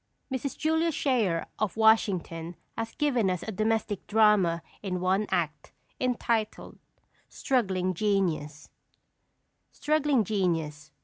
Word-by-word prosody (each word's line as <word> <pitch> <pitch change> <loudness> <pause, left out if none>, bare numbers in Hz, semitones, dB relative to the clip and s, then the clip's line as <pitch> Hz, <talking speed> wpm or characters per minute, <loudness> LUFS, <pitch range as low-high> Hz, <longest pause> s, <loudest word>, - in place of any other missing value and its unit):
Mrs. 260 +1 -3
Julia 320 +2 +1
Schayer, 230 - +1
of 215 -1 -1
Washington, 185 -6 +2 0.2
has 225 0 -5
given 250 -10 +1
us 180 -2 -2
a 220 - -4
domestic 215 -1 -1
drama 205 -6 +3 0.2
in 185 -3 -3
one 190 +3 +1
act, 150 -4 -2 0.3
entitled 235 -3 -1 0.5
Struggling 190 -8 0
Genius. 170 -7 -1 1.0
STRUGGLING 295 -5 +1
GENIUS. 165 -7 -1
205 Hz, 105 wpm, -28 LUFS, 175-230 Hz, 1.0 s, drama